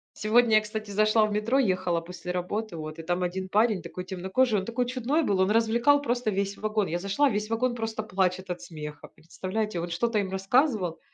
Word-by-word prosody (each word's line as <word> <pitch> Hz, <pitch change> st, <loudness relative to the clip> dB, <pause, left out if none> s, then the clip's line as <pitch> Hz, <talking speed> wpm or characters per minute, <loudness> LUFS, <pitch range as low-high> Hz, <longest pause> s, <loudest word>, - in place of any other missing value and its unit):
Сегодня, 220 Hz, +1 st, +3 dB
я 215 Hz, -, +6 dB
кстати, 215 Hz, -1 st, -6 dB
зашла 215 Hz, +2 st, +4 dB
в 215 Hz, -, -3 dB
метро, 220 Hz, +6 st, +1 dB
ехала 185 Hz, -7 st, +1 dB
после 180 Hz, +1 st, -7 dB
работы, 180 Hz, +3 st, -3 dB
вот. 155 Hz, 0 st, -7 dB
И -, -, -6 dB
там 175 Hz, +2 st, -1 dB
один, 185 Hz, +1 st, -3 dB
парень 210 Hz, -1 st, +2 dB
такой 180 Hz, -, -7 dB
темнокожий, 190 Hz, +5 st, +1 dB
он 190 Hz, -, -5 dB
такой 240 Hz, +3 st, -1 dB
чудной 255 Hz, +6 st, 0 dB
был, 200 Hz, -7 st, +1 dB
он 190 Hz, +2 st, +3 dB
развлекал 235 Hz, +6 st, +3 dB
просто 245 Hz, -3 st, -1 dB
весь 200 Hz, +1 st, -2 dB
вагон. 215 Hz, -2 st, 0 dB
Я 175 Hz, +2 st, -2 dB
зашла, 200 Hz, +10 st, +2 dB
весь 210 Hz, -1 st, -2 dB
вагон 240 Hz, +2 st, 0 dB
просто 225 Hz, -1 st, -3 dB
плачет 185 Hz, -2 st, -1 dB
от 175 Hz, -1 st, -4 dB
смеха. 150 Hz, -3 st, -8 dB
Представляете, 185 Hz, +4 st, -4 dB
он 170 Hz, +1 st, -4 dB
что-то 215 Hz, +6 st, 0 dB
им 190 Hz, -2 st, -2 dB
рассказывал. 195 Hz, -, +1 dB
210 Hz, 205 wpm, -27 LUFS, 180-225 Hz, -, я